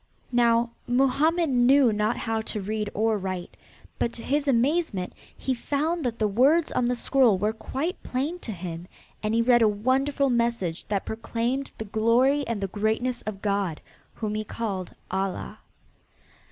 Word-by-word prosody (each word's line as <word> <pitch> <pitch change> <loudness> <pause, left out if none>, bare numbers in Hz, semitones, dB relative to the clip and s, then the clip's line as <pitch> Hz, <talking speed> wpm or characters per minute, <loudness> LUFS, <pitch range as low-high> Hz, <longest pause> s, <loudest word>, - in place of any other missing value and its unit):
Now 235 -1 +3 0.2
Mohammed 285 +6 +2
knew 250 0 +5
not 210 +2 0
how 225 -1 -1
to 220 - -4
read 210 +1 -2
or 220 0 +1
write, 185 -2 -5 0.4
but 235 - +1
to 230 - -7
his 290 +1 0
amazement 260 - +1 0.2
he 265 - -1
found 300 +7 -1
that 235 -2 -1
the 215 - +2
words 275 +11 +3
on 250 - +1
the 245 +1 +1
scroll 245 -4 +3
were 210 +3 0
quite 280 - -4
plain 290 +8 -2
to 235 - -5
him, 175 -2 -6 0.3
and 215 +1 0
he 230 - +3
read 240 0 +5
a 225 - +6
wonderful 260 +6 +1
message 235 -8 0
that 200 -2 -1
proclaimed 235 +4 -2
the 220 - -5
glory 235 +7 +2
and 230 -3 -2
the 195 - -1
greatness 220 +5 -1
of 200 -2 -5
God, 200 -6 0 0.4
whom 215 -2 -3
he 215 0 -2
called 200 -4 -4 0.2
Allah. 190 0 -3
230 Hz, 165 wpm, -26 LUFS, 210-265 Hz, 0.4 s, a